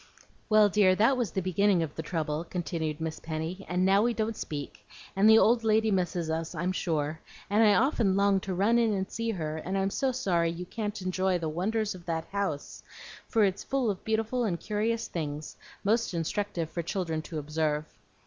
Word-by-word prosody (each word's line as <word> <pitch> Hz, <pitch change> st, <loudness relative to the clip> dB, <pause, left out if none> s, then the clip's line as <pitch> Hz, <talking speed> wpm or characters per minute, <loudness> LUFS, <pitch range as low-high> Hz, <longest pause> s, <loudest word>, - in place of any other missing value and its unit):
"Well, 215 Hz, -1 st, +6 dB
dear, 195 Hz, -2 st, +4 dB
that 225 Hz, +7 st, +4 dB
was 245 Hz, -5 st, -1 dB
the 190 Hz, +3 st, -3 dB
beginning 185 Hz, 0 st, +2 dB
of 150 Hz, -2 st, -5 dB
the -, -, -3 dB
trouble," 155 Hz, -1 st, -2 dB
continued 165 Hz, -3 st, -3 dB
Miss 160 Hz, -1 st, -4 dB
Penny; 160 Hz, +4 st, -4 dB
"and 180 Hz, +1 st, +1 dB
now 195 Hz, +1 st, +5 dB
we 235 Hz, +1 st, +1 dB
don't 220 Hz, 0 st, -1 dB
speak, 145 Hz, -6 st, -6 dB, 0.3 s
and 200 Hz, +3 st, +5 dB
the 220 Hz, -, +8 dB
old 230 Hz, +1 st, +4 dB
lady 220 Hz, 0 st, +3 dB
misses 180 Hz, -3 st, 0 dB
us, 160 Hz, +1 st, -3 dB
I'm 175 Hz, +4 st, -1 dB
sure, 160 Hz, -4 st, -1 dB, 0.3 s
and 210 Hz, +2 st, +4 dB
I 210 Hz, -2 st, +6 dB
often 230 Hz, -7 st, +2 dB
long 200 Hz, 0 st, +3 dB
to 190 Hz, 0 st, -4 dB
run 215 Hz, +6 st, +3 dB
in 225 Hz, -2 st, +2 dB
and 190 Hz, -1 st, -2 dB
see 230 Hz, 0 st, -2 dB
her, 160 Hz, -7 st, -3 dB
and 185 Hz, +4 st, -3 dB
I'm 195 Hz, 0 st, 0 dB
so 270 Hz, +4 st, 0 dB
sorry 180 Hz, -10 st, +1 dB
you 170 Hz, +2 st, -5 dB
can't 210 Hz, +2 st, -4 dB
enjoy 185 Hz, 0 st, +1 dB
the 165 Hz, -2 st, -3 dB
wonders 210 Hz, +6 st, -1 dB
of 180 Hz, -2 st, -13 dB
that 165 Hz, -1 st, -2 dB
house, 195 Hz, -8 st, -3 dB, 0.5 s
for 225 Hz, -3 st, +3 dB
it's 195 Hz, -1 st, 0 dB
full 265 Hz, -5 st, 0 dB
of 190 Hz, -, -7 dB
beautiful 225 Hz, +3 st, 0 dB
and 180 Hz, -7 st, -1 dB
curious 220 Hz, +2 st, -1 dB
things, 150 Hz, -2 st, -5 dB, 0.3 s
most 220 Hz, -2 st, +1 dB
instructive 170 Hz, -1 st, -2 dB
for 170 Hz, -, -2 dB
children 165 Hz, -2 st, -2 dB
to 160 Hz, 0 st, -7 dB
observe. 150 Hz, 0 st, -1 dB
190 Hz, 200 wpm, -29 LUFS, 165-215 Hz, 0.5 s, the